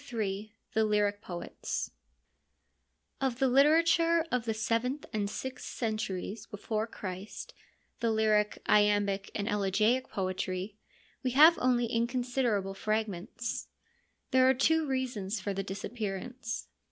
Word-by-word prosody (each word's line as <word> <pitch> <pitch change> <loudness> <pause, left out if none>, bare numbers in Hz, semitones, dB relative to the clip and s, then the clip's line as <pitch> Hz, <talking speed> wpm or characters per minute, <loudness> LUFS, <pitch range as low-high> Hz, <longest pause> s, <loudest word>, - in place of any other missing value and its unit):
— 215 +1 -16
The 220 0 +3
Lyric 205 -1 +1
Poets 175 -4 -4 1.3
Of 260 -3 0
the 265 0 +3
literature 330 +5 +4
of 250 -2 0
the 225 - 0
seventh 230 +6 -1
and 205 -2 0
sixth 260 +3 -5
centuries 215 -2 -3
before 215 +2 -3
Christ, 190 -1 -7 0.5
the 230 - +1
lyric, 215 -1 +2
iambic 205 -1 +3
and 205 0 -2
elegiac 210 +5 +2
poetry, 185 +1 -3 0.5
we 255 -2 -1
have 320 +3 +9
only 245 -1 +3
inconsiderable 235 -3 0
fragments. 215 +2 -3 0.6
There 260 -1 +6
are 265 - +4
two 320 +4 +3
reasons 240 -6 -2
for 200 +1 -3
the 195 - -2
disappearance. 220 +4 -5
220 Hz, 115 wpm, -31 LUFS, 205-255 Hz, 1.3 s, have